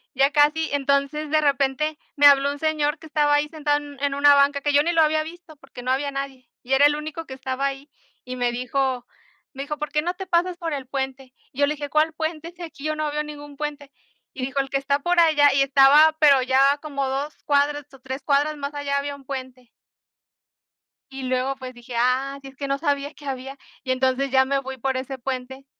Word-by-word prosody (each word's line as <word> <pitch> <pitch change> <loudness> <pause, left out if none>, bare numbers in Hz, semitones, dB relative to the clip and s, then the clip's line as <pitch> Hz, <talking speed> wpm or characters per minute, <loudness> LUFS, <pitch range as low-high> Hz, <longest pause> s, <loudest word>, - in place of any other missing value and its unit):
ya 275 +2 +3
casi. 300 +2 +3
Entonces, 280 +2 0
de 310 0 +3
repente 285 +2 0 0.2
me 290 0 +4
habló 280 0 +5
un 285 - -7
señor 310 -1 0
que 320 - -12
estaba 295 -1 +2
ahí 295 +1 +1
sentado 295 -2 0
en 290 -2 -10
en 280 -1 +1
una 285 0 +6
banca, 280 0 +3
que 290 0 0
yo 290 - +6
ni 340 - 0
lo 330 -1 +3
había 310 0 +2
visto 330 -1 -12
porque 270 -3 -12
no 255 - -1
había 280 +2 0
nadie, 270 -2 -6
y 260 +2 -2
era 280 +2 +6
el 290 0 +4
único 310 +2 -6
que 265 - -8
estaba 260 +1 -3
ahí, 275 +1 -7 0.4
y 255 0 -6
me 245 -1 0
dijo 250 0 -2 0.5
me 270 +1 -5
dijo: 295 +1 -5
"¿Por 300 0 -5
qué 300 - +1
no 350 +3 -2
te 385 - -6
pasas 350 0 0
por 330 -3 -4
el 270 -3 -5
puente?" 265 -1 -5 0.2
Y 270 - -12
yo 285 - +5
le 300 - -1
dije: 290 -1 -6
"¿Cuál 310 +1 +2
puente? 320 +1 -4
Si 355 - -14
aquí 315 -4 -9
yo 310 0 -1
no 305 -1 -2
veo 300 0 -2
ningún 290 -1 -10
puente." 290 -2 -5 0.4
Y 255 - -4
dijo: 270 +1 -3
"El 270 0 -1
que 275 - 0
está 280 +1 0
por 350 +3 +1
allá", 295 -4 +5
y 275 - +3
estaba 280 +3 +6
pero 280 -4 +6
ya 270 +2 +3
como 280 -3 -3
2 280 +3 -3
cuadras 290 0 +1
o 270 - -14
3 265 +2 -6
cuadras 295 +1 +1
más 280 +1 -5
allá 285 -1 -2
había 285 0 -3
1 275 -1 -16
puente. 255 -3 -7 1.4
Y 265 0 -7
luego 255 +1 -1
pues 255 -1 -9
dije: 240 0 -12
"Ah, 260 +3 +1
sí, 270 - -10
es 265 - -18
que 280 0 -5
no 275 0 0
sabía 285 -1 -1
que 290 - -14
había", 270 0 -5 0.3
y 260 - -2
entonces 260 +1 +1
ya 265 0 +4
me 275 +1 0
voy 265 0 -7
por 265 +2 -2
ese 265 +1 -4
puente 265 +1 -6
280 Hz, 235 wpm, -23 LUFS, 265-300 Hz, 1.4 s, una